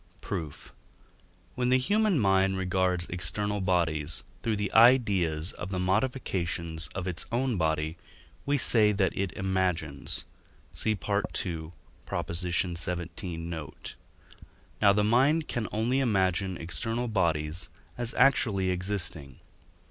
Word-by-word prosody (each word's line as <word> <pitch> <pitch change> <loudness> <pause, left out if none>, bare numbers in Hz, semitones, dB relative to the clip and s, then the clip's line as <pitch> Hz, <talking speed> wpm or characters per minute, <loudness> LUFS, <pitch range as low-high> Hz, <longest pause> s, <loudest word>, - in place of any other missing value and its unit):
Proof. 80 -4 -6 0.8
When 125 -1 0
the 130 - +5
human 205 +7 +2
mind 95 -2 +3
regards 90 -1 +1
external 100 +4 -1
bodies 85 -4 0 0.2
through 110 -2 0
the 105 -1 -3
ideas 100 -9 +4
of 90 - -6
the 95 - -3
modifications 90 -6 -1
of 95 -2 -3
its 90 -2 -4
own 125 +1 0
body, 80 -1 0 0.5
we 145 0 +1
say 110 -4 +4
that 95 -3 +1
it 95 -2 -1
imagines 90 -7 -1 0.5
(see 110 -1 0
II. 90 -6 -2 0.5
xvii. 85 0 -2
note); 80 -3 -7 0.9
now 100 -2 +7
the 105 +1 +2
mind 135 +9 +3
can 120 -3 -2
only 120 +5 +1
imagine 95 -6 +1
external 115 +8 -2
bodies 85 -6 0 0.3
as 120 -1 -1
actually 110 -8 +3
existing. 90 -7 -2
95 Hz, 115 wpm, -28 LUFS, 85-110 Hz, 0.9 s, now